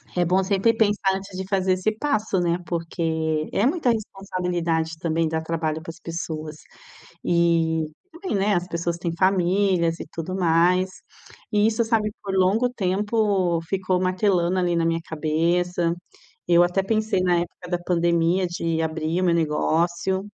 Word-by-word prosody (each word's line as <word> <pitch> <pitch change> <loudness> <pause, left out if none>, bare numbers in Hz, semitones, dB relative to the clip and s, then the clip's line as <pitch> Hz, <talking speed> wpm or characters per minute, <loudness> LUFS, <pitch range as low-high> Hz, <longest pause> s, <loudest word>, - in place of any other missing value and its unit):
é 180 - +2
bom 185 +3 +2
sempre 200 +4 +2
pensar 205 -3 +2
antes 195 0 -7
de 190 - -4
fazer 190 -1 +1
esse 185 +4 0
passo, 220 -8 0
né, 175 0 +1
porque 160 -2 -2
é 210 - +1
muita 300 -3 +1
responsabilidade 180 -6 -2
também 165 -1 0
dar 160 0 -1
trabalho 160 -1 -2
para 165 - -10
as - - -17
pessoas. 160 -2 -5 0.7
E 165 -2 +2 0.3
também, 350 - -4
né, 200 +1 +2
as 175 0 0
pessoas 170 0 -2
têm 170 -1 -3
famílias 185 -2 +2
e - - -6
tudo 170 +3 -5
mais. 180 +1 +3 0.6
E 210 0 +3
isso, 225 +1 +1
sabe, 220 -2 +1
por 195 -1 -4
longo 195 +6 +3
tempo 200 -4 0
ficou 185 -1 0
martelando 185 -1 +1
ali 175 -1 +1
na 165 -1 +1
minha 165 0 +1
cabeça. 170 +2 0 0.5
Eu 175 0 +5
até 180 +2 +1
pensei 215 -2 0
na 180 -1 +2
época 175 +1 -5
da 175 -1 -1
pandemia 175 +1 +1
de 165 -1 -2
abrir 160 +2 -1
o - - +1
meu 175 - +3
negócio, 170 +4 0
180 Hz, 160 wpm, -23 LUFS, 165-195 Hz, 0.7 s, Eu